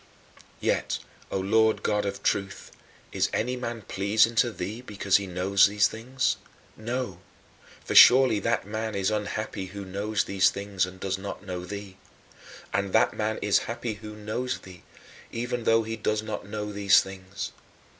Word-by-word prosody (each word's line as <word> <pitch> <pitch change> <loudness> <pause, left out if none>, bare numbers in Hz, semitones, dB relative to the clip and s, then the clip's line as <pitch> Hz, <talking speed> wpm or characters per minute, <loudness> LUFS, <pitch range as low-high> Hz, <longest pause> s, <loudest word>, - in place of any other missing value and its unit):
Yet, - - 0 0.3
O - - -2
Lord 110 +3 +2
God 105 -1 +1
of 100 - -5
Truth, 100 -1 -1 0.4
is - - +1
any 125 +3 0
man 120 -3 -5
pleasing 105 +4 +2
to 120 0 +4
thee 105 +4 -5
because 100 -5 +1
he 100 -1 -5
knows 95 +2 +4
these 105 0 +3
things? 130 +3 -1 0.4
No, 115 -4 -4 0.7
for - - -3
surely 125 -4 +8
that 115 +1 0
man 110 +1 -3
is 100 +1 +1
unhappy 105 -1 -3
who 100 +1 -8
knows 100 +3 -1
these 95 -1 +3
things 100 -2 -2
and 95 0 -11
does 95 0 -2
not 100 0 -7
know 90 -2 -5
thee. 100 0 -8 0.8
And 100 -1 -1
that - - +4
man 110 0 -1
is 105 -1 +4
happy 115 -1 -3
who 105 +1 -9
knows 110 +4 -3
thee, 90 -2 -13 0.5
even 120 0 -3
though 115 0 +4
he 115 +1 -4
does 110 0 -1
not 110 -2 -5
know 105 0 -4
these 100 -1 +5
things. 95 0 -7
105 Hz, 165 wpm, -27 LUFS, 95-110 Hz, 0.8 s, surely